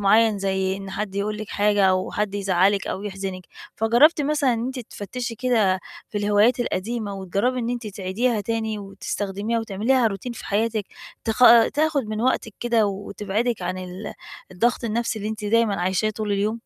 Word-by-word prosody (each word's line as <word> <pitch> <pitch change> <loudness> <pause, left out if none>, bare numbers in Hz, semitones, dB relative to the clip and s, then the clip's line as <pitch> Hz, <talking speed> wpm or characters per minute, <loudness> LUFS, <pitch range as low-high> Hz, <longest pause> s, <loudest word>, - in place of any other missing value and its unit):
معين 215 +1 +4
زي 190 -1 0
إن 195 -1 -8
حد 195 0 -4
يقول 210 +1 -1
لِك 215 -1 -6
حاجة 205 -1 +2
أو 185 -1 +2
حد 210 -1 -1
يزعلِك 195 0 +2
أو 190 - -3
يحزِنِك. 195 -2 -5 0.3
فجرّبتِ 240 +9 +5
مثلًا 290 -2 +2
إن 230 +1 -2
أنتِ 260 0 -4
تفتشي 235 +2 -6
كده 220 -6 +2 0.3
في 210 - -3
الهوايات 210 +4 +3
القديمة، 220 -1 -2
وتجرّبي 200 +7 -1
إن 235 - -1
أنتِ 240 -2 -4
تعيديها 210 +4 -1
تاني 220 0 -2
وتستخدميها 200 +2 -3
وتعمليها 225 +4 +2
routine 210 +4 -5
في - - -9
حياتِك، 215 +1 0 0.4
تخ 225 -1 -1 0.4
تاخد 305 -2 +2
من 215 0 -3
وقتِك 230 -3 0
كده 235 -3 +2
وتبعدِك 205 +3 -2
عن 185 +1 -2
ال 185 +3 -7 0.4
الضغط 235 +7 0
النفْسي 230 0 -1
اللي 210 0 -3
أنتِ 215 -1 -6
دايمًا 210 -2 +2
عايشاه 190 +4 +1
طول 215 -1 -3
اليوم؟ 210 +3 0
210 Hz, 170 wpm, -23 LUFS, 195-230 Hz, 0.4 s, فجرّبتِ